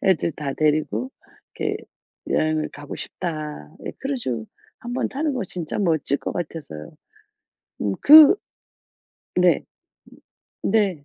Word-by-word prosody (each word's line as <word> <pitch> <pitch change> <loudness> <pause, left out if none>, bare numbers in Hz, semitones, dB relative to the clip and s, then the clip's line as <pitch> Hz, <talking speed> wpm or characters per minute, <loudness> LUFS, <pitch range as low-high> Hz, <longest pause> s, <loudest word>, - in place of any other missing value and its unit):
애들 170 -3 +2
다 145 -3 -4
데리고 155 - +1 0.5
이렇게 - - 0 0.5
여행을 155 0 +1
가고 145 0 -8
싶다 150 - -5 0.2
예 - - -2
크루즈 235 - -3 0.3
한 240 +1 -7
번 - - 0
타는 290 +1 -1
거 250 -5 -2
진짜 175 -3 -5
멋질 160 -7 +1
것 - - -4
같아서요. 150 - -6 0.9
음. 100 -1 0
그 305 +2 +10 1.0
네. - - +4 1.0
네. 195 -9 +1
160 Hz, 205 characters per minute, -23 LUFS, 145-220 Hz, 1.0 s, 그